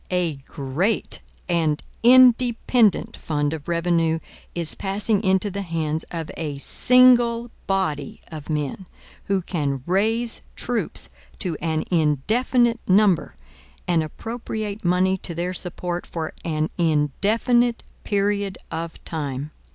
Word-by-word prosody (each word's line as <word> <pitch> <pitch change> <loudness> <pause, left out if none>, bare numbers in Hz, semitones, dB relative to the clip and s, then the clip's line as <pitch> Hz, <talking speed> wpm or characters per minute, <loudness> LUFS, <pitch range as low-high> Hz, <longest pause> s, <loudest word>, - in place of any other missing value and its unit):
A 175 -5 0
GREAT 160 +10 -1 0.3
and 160 -4 +1 0.2
INDEPENDENT 245 -3 +5
fund 145 -1 -1
of 150 -2 -7
revenue 170 -1 +1 0.4
is 170 -2 +1
passing 205 +2 0
into 190 +1 +2
the 200 +2 -3
hands 160 -3 -2
of 165 -2 -5
a 155 -3 -4
SINGLE 240 - +4 0.2
BODY 155 -8 -1
of 155 -2 -8
men, 150 +4 -3 0.4
who 195 -2 0
can 140 -7 -2
RAISE 225 +6 +1
TROOPS 240 -2 -2 0.3
to 180 -5 -1
an 160 -1 0
INDEFINITE 225 - +2
NUMBER, 195 -2 +3 0.5
and 170 -2 +3
appropriate 215 +4 -5
money 185 +2 +2
to 170 - -1
their 175 +2 -2
support 175 -1 -2
for 160 -2 -4
an 155 -1 -1
INDEFINITE 210 - +2 0.2
PERIOD 200 -1 0
OF 165 0 -6
TIME. 145 -2 -4
180 Hz, 115 wpm, -23 LUFS, 160-215 Hz, 0.5 s, INDEPENDENT